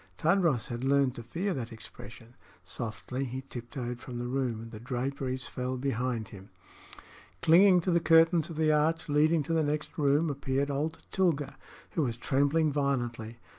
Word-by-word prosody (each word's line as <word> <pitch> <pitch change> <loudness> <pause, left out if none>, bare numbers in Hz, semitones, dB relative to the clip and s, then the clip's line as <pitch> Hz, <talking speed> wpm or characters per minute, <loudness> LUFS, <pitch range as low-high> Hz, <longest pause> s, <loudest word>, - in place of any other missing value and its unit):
Tadros 165 - +2
had 120 0 -4
learned 135 -1 +3
to 120 - -8
fear 180 - -2
that 125 -5 -5
expression. 115 +1 -12 0.3
Softly 115 +6 -4
he 130 0 -5
tiptoed 120 -1 -6
from 125 -1 -7
the 120 - -3
room, 125 -3 -1
and 115 0 -9
the 110 - -8
draperies 130 +2 -2
fell 130 0 -4
behind 125 -4 -2
him. 95 -1 -12 0.9
Clinging 180 +2 +6
to 180 - 0
the 170 - +4
curtains 165 0 +4
of 165 - -7
the 155 0 +2
arch 155 +2 +1
leading 155 +2 +3
to 165 - -2
the 165 - +3
next 150 0 -2
room, 145 +2 +3
appeared 140 0 -1
old 150 +3 -3
Tilga, 165 -7 0 0.4
who 165 - 0
was 120 -5 -1
trembling 145 +4 +2
violently. 120 -5 -2
135 Hz, 170 wpm, -29 LUFS, 120-155 Hz, 0.9 s, Clinging